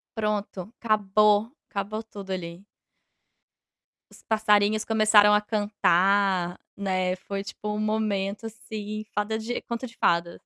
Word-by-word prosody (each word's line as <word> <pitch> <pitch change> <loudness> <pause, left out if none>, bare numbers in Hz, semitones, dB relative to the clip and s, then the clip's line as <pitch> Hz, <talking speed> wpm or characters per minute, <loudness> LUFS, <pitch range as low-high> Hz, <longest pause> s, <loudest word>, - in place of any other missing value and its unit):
Pronto, 210 -1 -3
acabou, 210 +1 +3 0.2
acabou 210 +3 -4
tudo 200 -3 -9
ali. 180 +1 -6 1.4
Os - - -18
passarinhos 215 -1 +2
começaram 215 -2 +5
a 210 - +4
cantar, 195 -3 +2 0.2
né, 185 -2 0
foi 195 +1 -5
tipo 210 0 -8
um 210 - -3
momento, 215 -1 -1
assim, 215 -1 -6
fada 210 +2 -1
de 230 +2 -4
conta 235 +2 -4
de 230 - -12
fada. 170 0 +1
210 Hz, 120 wpm, -26 LUFS, 195-215 Hz, 1.4 s, começaram